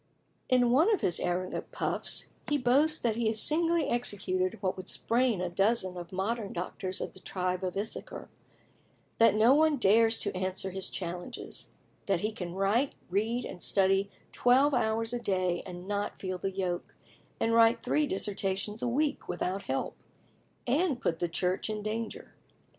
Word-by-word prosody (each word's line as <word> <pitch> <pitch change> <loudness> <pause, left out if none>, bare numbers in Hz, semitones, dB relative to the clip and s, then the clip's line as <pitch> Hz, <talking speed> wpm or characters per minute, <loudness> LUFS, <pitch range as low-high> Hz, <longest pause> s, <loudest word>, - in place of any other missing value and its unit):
In 245 -2 +4
one 315 - +4
of 420 - +1
his 175 - +4
arrogant 180 +1 -2
puffs, - - -1 0.2
he 295 - +2
boasts 285 +5 +3
that 230 -2 -1
he 235 -2 +1
has 220 0 0
singly 330 +3 +3
executed 190 -4 0
what 190 -2 -1
"would 185 0 -7
sprain 235 -4 +1
a 180 - -1
dozen 190 +1 +1
of 175 0 -8
modern 200 +3 -2
doctors 185 +2 -4
of - - -5
the - - -14
tribe 185 0 -3
of 185 0 -3
Issachar;" 210 +2 -4 0.9
that 230 -1 +6
no 225 +4 +6
one 310 0 +4
dares 225 0 +4
to 205 - -1
answer 185 +1 -2
his 190 0 -4
challenges; 175 -1 -5 0.4
that 195 -4 +1
he 215 - -1
can 180 -5 -6
write, 210 +8 +1 0.2
read, 225 +5 0
and 175 - -8
study 195 +1 +3 0.2
twelve 265 +4 +4
hours 225 -1 +1
a 245 - -1
day 185 -5 0
and 180 0 -8
not 205 0 -3
feel 185 -1 -4
the 195 - -2
yoke; 185 -2 -4 0.4
and 230 - +1
write 230 0 +5
three 295 +4 +1
dissertations 195 0 -2
a - - -1
week 285 +5 -1
without 180 +2 -3
help, 135 - -2 0.7
and 285 +1 +1
put 165 -7 -1
the 175 - -1
Church 180 +5 -1
in 215 -1 -3
danger. 220 +2 -5
205 Hz, 170 wpm, -30 LUFS, 185-240 Hz, 0.9 s, that